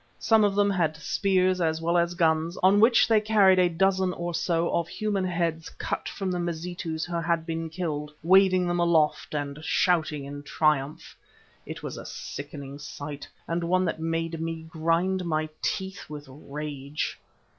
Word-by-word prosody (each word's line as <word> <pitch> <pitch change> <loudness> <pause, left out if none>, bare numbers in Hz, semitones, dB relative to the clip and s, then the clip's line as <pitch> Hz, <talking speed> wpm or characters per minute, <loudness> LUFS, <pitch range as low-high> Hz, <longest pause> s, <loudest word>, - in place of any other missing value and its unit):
Some 220 -1 +4
of 200 -1 +2
them 205 0 +3
had 165 -5 0
spears 185 +4 +1
as 160 -1 +1
well 170 +1 0
as 175 0 +2
guns, 165 0 +1
on 195 +2 +6
which 230 +2 +6
they 220 -2 +4
carried 205 -3 +5
a 180 -1 +4
dozen 190 +1 +1
or 175 0 -4
so 165 0 0
of 170 -1 0
human 205 -2 -1
heads 165 -2 -1
cut - - -4
from 195 -2 -3
the 180 - -1
Mazitus 170 -1 -3
who 175 -1 -3
had 170 -1 0
been 165 -1 -3
killed, 155 -4 -4
waving 185 +1 +5
them 175 0 0
aloft 160 -3 +2
and 145 +1 -4
shouting 155 -5 +1
in 145 +1 -7
triumph. 150 -1 0 0.5
It - - -7
was - - -5
a - - -8
sickening 140 -1 -7
sight, 145 0 -7 0.2
and 170 +1 -1
one 185 +2 +2
that 165 - -2
made 165 0 -2
me 165 0 -4
grind 170 +3 0
my 155 -2 -1
teeth 190 -3 -3
with 150 -1 -8
rage. 145 +1 -5
170 Hz, 170 wpm, -26 LUFS, 155-185 Hz, 0.5 s, on